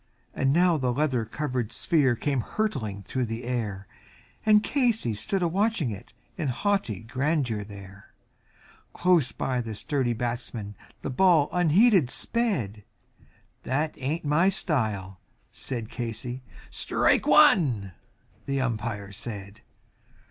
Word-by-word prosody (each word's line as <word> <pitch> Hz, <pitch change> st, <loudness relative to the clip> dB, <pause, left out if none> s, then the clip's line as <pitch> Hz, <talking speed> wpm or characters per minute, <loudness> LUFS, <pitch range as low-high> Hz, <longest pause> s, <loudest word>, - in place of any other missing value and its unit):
And 135 Hz, 0 st, +1 dB
now 175 Hz, +2 st, +4 dB
the 130 Hz, -3 st, 0 dB
leather 130 Hz, -3 st, 0 dB
covered 125 Hz, -2 st, -3 dB
sphere 145 Hz, -8 st, +2 dB
came 135 Hz, +1 st, -1 dB
hurtling 110 Hz, -, -3 dB
through 125 Hz, +7 st, -2 dB
the 115 Hz, +2 st, -5 dB
air, 110 Hz, -6 st, -3 dB, 0.6 s
And 210 Hz, 0 st, +6 dB
Casey 235 Hz, -, +1 dB
stood 180 Hz, -, -2 dB
a -, -, +3 dB
watching 195 Hz, -, 0 dB
it 100 Hz, -, -9 dB, 0.3 s
in 160 Hz, -5 st, -2 dB
haughty 130 Hz, -, -1 dB
grandeur 130 Hz, -2 st, -1 dB
there; 100 Hz, -1 st, -12 dB, 0.8 s
Close 175 Hz, -7 st, +3 dB
by 125 Hz, -2 st, -2 dB
the 110 Hz, -2 st, -6 dB
sturdy 130 Hz, +1 st, -1 dB
batsman 120 Hz, -3 st, -4 dB, 0.3 s
the -, -, -3 dB
ball 165 Hz, 0 st, +4 dB
unheeded 180 Hz, -, +4 dB
sped 125 Hz, -, -1 dB, 0.8 s
"That 150 Hz, +5 st, -1 dB
hain't 150 Hz, +5 st, -3 dB
my 160 Hz, +6 st, +3 dB
style," 105 Hz, -, -1 dB, 0.3 s
said 120 Hz, -4 st, -4 dB
Casey 120 Hz, +2 st, -5 dB, 0.3 s
"Strike -, -, +1 dB
one," 115 Hz, -, +5 dB, 0.6 s
the 140 Hz, 0 st, 0 dB
Umpire 110 Hz, -5 st, -3 dB
said. 100 Hz, -1 st, -7 dB
125 Hz, 120 wpm, -26 LUFS, 110-160 Hz, 0.8 s, And